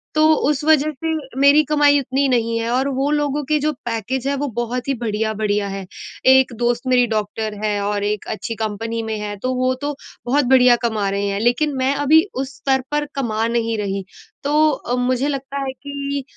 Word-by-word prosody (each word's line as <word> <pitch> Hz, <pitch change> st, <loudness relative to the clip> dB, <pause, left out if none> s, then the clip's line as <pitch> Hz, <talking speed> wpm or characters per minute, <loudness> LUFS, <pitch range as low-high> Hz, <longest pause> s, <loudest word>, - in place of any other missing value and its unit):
तो 310 Hz, 0 st, +5 dB, 0.2 s
उस 295 Hz, -1 st, 0 dB
वज़ह 310 Hz, -1 st, +3 dB
से 325 Hz, 0 st, 0 dB, 0.3 s
मेरी 285 Hz, +2 st, +6 dB
कमाई 290 Hz, -1 st, +4 dB
उतनी 275 Hz, +1 st, 0 dB
नहीं 230 Hz, -2 st, +1 dB
है 230 Hz, 0 st, -2 dB
और 260 Hz, +3 st, +1 dB
वो 275 Hz, +2 st, +1 dB
लोगों 295 Hz, -1 st, 0 dB
के 305 Hz, +2 st, +1 dB
जो 305 Hz, +1 st, 0 dB
पैकेज़ 240 Hz, +3 st, -2 dB
हैं 280 Hz, -, 0 dB
वो 290 Hz, -, -2 dB
बहुत 245 Hz, +2 st, -3 dB
ही 275 Hz, -, +1 dB
बढिया-बढिया 215 Hz, -2 st, -1 dB
हैं। 195 Hz, -1 st, -5 dB, 0.5 s
एक 265 Hz, -1 st, +4 dB
दोस्त 240 Hz, 0 st, 0 dB
मेरी 250 Hz, -1 st, +4 dB
डॉक्टर 215 Hz, 0 st, -2 dB
है, 210 Hz, -1 st, 0 dB
और 205 Hz, 0 st, -1 dB
एक 210 Hz, 0 st, -2 dB
अच्छी 225 Hz, +1 st, -4 dB
कंपनी 225 Hz, +1 st, -3 dB
में 220 Hz, -1 st, -3 dB
है। 210 Hz, 0 st, -4 dB
तो 255 Hz, +5 st, -2 dB
वो 255 Hz, 0 st, +1 dB
तो 290 Hz, 0 st, -2 dB, 0.3 s
बहुत 270 Hz, +3 st, +2 dB
बढिया 250 Hz, -1 st, +6 dB
कमा 215 Hz, -4 st, 0 dB
रहे 200 Hz, +1 st, -1 dB
हैं, 200 Hz, 0 st, -2 dB
लेकिन 245 Hz, +6 st, +1 dB
मैं 260 Hz, +2 st, +1 dB
अभी 295 Hz, +3 st, +4 dB
उस 265 Hz, +1 st, -4 dB
स्तर 265 Hz, -1 st, +1 dB
पर 295 Hz, 0 st, 0 dB
कमा 225 Hz, -4 st, -1 dB
नहीं 230 Hz, -1 st, -1 dB
रही। 195 Hz, -2 st, -3 dB, 0.4 s
तो 300 Hz, +2 st, +3 dB
अ, 245 Hz, -3 st, -3 dB
मुझे 250 Hz, +2 st, 0 dB
लगता 275 Hz, -1 st, -4 dB
है 270 Hz, -1 st, -2 dB
कि 280 Hz, -1 st, -4 dB
250 Hz, 200 wpm, -20 LUFS, 220-280 Hz, 0.5 s, मेरी